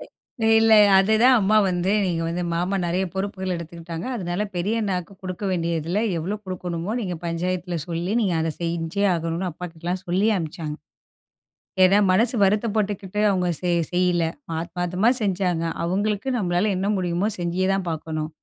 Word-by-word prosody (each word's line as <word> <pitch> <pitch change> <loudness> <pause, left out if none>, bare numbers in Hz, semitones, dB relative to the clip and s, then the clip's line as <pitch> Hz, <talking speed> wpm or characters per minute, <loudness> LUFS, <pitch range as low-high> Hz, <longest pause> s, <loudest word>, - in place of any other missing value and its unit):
எ 235 - -5
இல்ல, 225 0 +6 0.2
அதுதான் 220 +6 +5
அம்மா 210 +2 +3
வந்து 180 +1 0
நீங்க 170 -3 -1
வந்து 175 +2 -2
மாமா 180 +4 0
நெறயா 180 +3 0
பொறுப்புகள் 190 -1 -3
எடுத்துக்கிட்டாங்க, 170 0 -7
அதுனால 180 -1 -2
பெரிய 205 +6 0
அண்ணாக்கு 185 -3 -2
கொடுக்க 185 +1 -6
வேண்டியதுல 170 0 -1 0.2
எவ்ளோ 185 +6 -3
கொடுக்கணுமோ, 180 0 -4
நீங்க 185 -5 -3
பஞ்சாயத்துல 175 +1 -2
சொல்லி 175 +2 -2
நீங்க 195 -6 +1
அத 160 0 0
செஞ்சே 170 +3 -1
ஆகணும்னு, 165 +2 -2
அப்பாகிட்டலாம் 175 +2 -5
சொல்லி 185 +5 +2
அனுப்ச்சாங்க. 155 -2 -5 1.1
ஏன்னா 195 +2 +6
மனசு 225 +6 +3
வருத்தப்பட்டுக்கிட்டு 205 -1 0
அவுங்க 185 -2 +1
செய் 175 -1 +1
செய்யல. 180 -1 +2 0.4
ஆத்மாதமா 180 +5 0
செஞ்சாங்க, 180 -4 0 0.2
அவுங்களுக்கு 205 +7 -1
நம்மளால 180 0 +1
என்ன 190 +2 -1
முடியுமோ 180 +1 0
செஞ்சியே 175 +2 0
தான் 195 -2 -2
பார்க்கணும். 155 -1 -4
180 Hz, 140 wpm, -23 LUFS, 170-195 Hz, 1.1 s, இல்ல